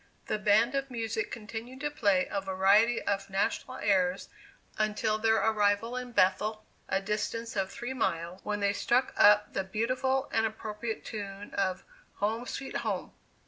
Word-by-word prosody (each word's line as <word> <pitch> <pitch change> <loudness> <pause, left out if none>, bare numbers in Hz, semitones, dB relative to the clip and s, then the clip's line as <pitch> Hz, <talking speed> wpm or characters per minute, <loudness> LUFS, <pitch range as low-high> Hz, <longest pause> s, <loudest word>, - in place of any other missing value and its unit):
The 215 - -1
band 215 +4 +4
of 275 0 -1
music 225 -2 -2
continued 230 +4 -7
to 295 0 -1
play 200 -9 +2
a 200 - -1
variety 195 +5 +4
of 200 -1 -1
national 205 +6 -1
airs 190 -2 +1 0.5
until 215 0 +1
their 220 0 +3
arrival 220 +1 +2
in 250 -1 -5
Bethel, 215 +1 +2 0.2
(a 190 - +2
distance 215 +3 -3
of 195 -1 0
three 240 +5 -5
miles,) 175 -7 -2
when 205 -1 -2
they 200 0 +2
struck 245 +5 +1
up 210 0 +5
the 195 - 0
beautiful 255 +7 0
and 225 - +3
appropriate 220 +1 -5
tune 200 -1 -7
of 190 -2 -1 0.3
'Home, 225 +4 -1
Sweet 270 - -4
Home! - - -3
215 Hz, 155 wpm, -30 LUFS, 200-230 Hz, 0.5 s, up